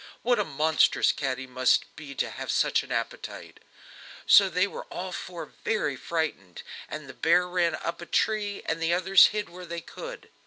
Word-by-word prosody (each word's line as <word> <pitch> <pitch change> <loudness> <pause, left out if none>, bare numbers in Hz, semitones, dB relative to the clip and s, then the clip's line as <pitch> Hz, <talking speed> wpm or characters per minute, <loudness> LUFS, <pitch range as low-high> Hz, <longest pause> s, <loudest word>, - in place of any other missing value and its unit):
What 245 -1 +2
a - - +3
monstrous 155 0 +3
cat 130 -2 -2
he 130 - -6
must 130 0 +1
be 145 -3 -9
to - - -1
have - - -7
such - - +2
an - - -12
appetite!" - - -5 0.7
So 195 -1 +7
they 180 +2 +2
were 200 - -7
all 185 +1 -6
four 180 -2 -6 0.2
very 210 -11 0
frightened, 150 - -4 0.3
and 155 -2 -7
the 130 - -9
bear 175 +5 +3
ran 175 -2 +1
up 170 +2 -5
a 170 - -8
tree, 210 -2 0
and 165 0 -2
the 165 +1 +2
others 185 +1 +6
hid 210 0 -3
where 180 +1 -11
they 170 0 -4
could. - - -9
170 Hz, 190 wpm, -27 LUFS, 155-190 Hz, 0.7 s, So